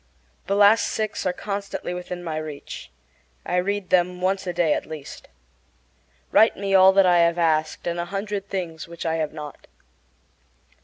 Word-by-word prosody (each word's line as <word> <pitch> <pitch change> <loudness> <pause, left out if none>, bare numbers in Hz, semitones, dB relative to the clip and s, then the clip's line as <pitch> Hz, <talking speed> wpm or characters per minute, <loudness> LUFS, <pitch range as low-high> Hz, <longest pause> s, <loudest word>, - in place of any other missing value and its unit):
The 200 - +1
last 205 +2 +5
six 215 -3 -2
are - - +2
constantly 200 -1 -5
within 180 0 -6
my 160 -2 -3
reach. 155 -2 -7 0.6
I 180 - -1
read 200 +1 -1
them 180 0 +2
once 190 +1 -1
a - - 0
day 170 -3 +2
at - - -3
least. 155 -3 -9 1.0
Write 220 - +5
me 195 0 -2
all 190 0 +8
that 195 0 +5
I 175 -1 +5
have 170 0 +3
asked, 155 -2 0
and 170 0 -2
a 170 - -2
hundred 200 +2 -4
things 170 -5 -4
which 170 0 -8
I 165 0 0
have 155 -2 -2
not. 150 -2 -9
180 Hz, 170 wpm, -23 LUFS, 165-195 Hz, 1.0 s, all